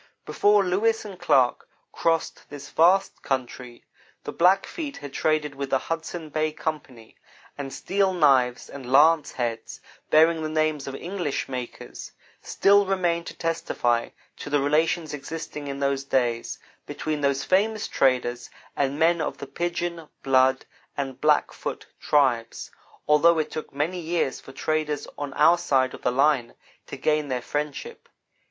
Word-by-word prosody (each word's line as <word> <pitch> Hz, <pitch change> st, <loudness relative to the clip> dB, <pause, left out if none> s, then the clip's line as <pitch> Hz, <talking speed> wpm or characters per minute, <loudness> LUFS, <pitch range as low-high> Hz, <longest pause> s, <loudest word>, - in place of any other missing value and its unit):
Before 205 Hz, 0 st, +3 dB
Lewis 220 Hz, +5 st, +1 dB
and 195 Hz, -3 st, -9 dB
Clark 125 Hz, -2 st, +2 dB, 0.2 s
crossed 165 Hz, -1 st, -1 dB
this 140 Hz, -1 st, -10 dB
vast 185 Hz, +4 st, +3 dB
country, 125 Hz, -2 st, -4 dB, 0.4 s
the -, -, -5 dB
Blackfeet 195 Hz, -, +1 dB
had 145 Hz, -2 st, -9 dB
traded 155 Hz, -2 st, 0 dB
with 135 Hz, 0 st, -5 dB
the 135 Hz, -, +3 dB
Hudson 165 Hz, +2 st, -5 dB
Bay 155 Hz, +1 st, -1 dB
Company, 145 Hz, -8 st, -6 dB, 0.4 s
and 140 Hz, -2 st, -6 dB
steel 195 Hz, +4 st, 0 dB
knives 135 Hz, -8 st, +3 dB
and 130 Hz, -3 st, -9 dB
lance 155 Hz, +3 st, +5 dB
heads, 120 Hz, -2 st, -4 dB, 0.3 s
bearing 160 Hz, +1 st, +4 dB
the 155 Hz, -, -3 dB
names 155 Hz, -2 st, 0 dB
of 135 Hz, -, -5 dB
English 175 Hz, -3 st, -3 dB
makers, 125 Hz, -2 st, -7 dB, 0.3 s
still 200 Hz, 0 st, +3 dB
remain 175 Hz, -3 st, 0 dB
to -, -, -8 dB
testify 120 Hz, -8 st, -1 dB, 0.3 s
to -, -, -7 dB
the 145 Hz, 0 st, +2 dB
relations 155 Hz, +3 st, +1 dB
existing, 150 Hz, 0 st, -6 dB
in 140 Hz, 0 st, -5 dB
those 140 Hz, -1 st, 0 dB
days, 120 Hz, -4 st, -1 dB, 0.3 s
between 155 Hz, -1 st, -3 dB
those 140 Hz, -1 st, +1 dB
famous 210 Hz, +3 st, +1 dB
traders 125 Hz, -2 st, 0 dB, 0.3 s
and 140 Hz, 0 st, 0 dB
men 165 Hz, +1 st, +3 dB
of 150 Hz, -, -3 dB
the -, -, -7 dB
Piegan, 170 Hz, +2 st, -4 dB
Blood, 130 Hz, 0 st, +3 dB, 0.3 s
and 135 Hz, -2 st, -4 dB
Blackfoot 150 Hz, -1 st, 0 dB
tribes, 125 Hz, -6 st, +1 dB, 0.4 s
although 160 Hz, +3 st, +5 dB
it 155 Hz, -1 st, -1 dB
took 155 Hz, -, -6 dB
many 155 Hz, +6 st, -2 dB
years 165 Hz, -4 st, -1 dB
for -, -, -13 dB
traders 150 Hz, +1 st, -2 dB
on 145 Hz, -1 st, -5 dB
our 155 Hz, +2 st, +5 dB
own 175 Hz, -, +2 dB
side 135 Hz, -6 st, +1 dB
of -, -, -10 dB
the -, -, +1 dB
line 135 Hz, -2 st, +2 dB, 0.3 s
to -, -, -7 dB
gain 150 Hz, -1 st, 0 dB
their 130 Hz, -2 st, -1 dB
friendship. 145 Hz, -1 st, -5 dB
150 Hz, 150 wpm, -25 LUFS, 135-165 Hz, 0.4 s, lance